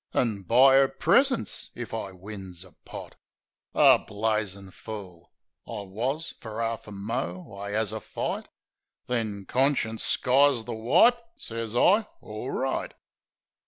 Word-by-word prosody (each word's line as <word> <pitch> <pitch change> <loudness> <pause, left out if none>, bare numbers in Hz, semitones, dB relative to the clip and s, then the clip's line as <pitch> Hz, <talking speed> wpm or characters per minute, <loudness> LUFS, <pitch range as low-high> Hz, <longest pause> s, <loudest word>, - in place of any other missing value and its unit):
An' 110 -5 +1
buy 130 +7 +6
'er 135 0 +6
presents 270 - +2
if 120 -2 -6
I 110 -3 -3
wins 95 -2 -8
a 95 - -17
pot?" - - -10 0.6
A - - +7
blazin' 105 -3 -2
fool 95 -6 -9 0.4
I 110 -3 -5
wus. 125 - -3
Fer 110 -1 -7
'arf 115 -1 -2
a - - -9
mo' 100 -3 -4
I 100 +1 -6
'as 110 -1 +1
a 110 - -4
fight; - - -4 0.6
Then 110 -5 -2
conscience 130 -4 +1
skies 135 -1 +4
the 120 - -4
wipe... 125 - +4 0.2
Sez 115 0 -4
I 205 - +4
"Orright." 130 +5 -3
110 Hz, 130 wpm, -27 LUFS, 100-125 Hz, 0.6 s, A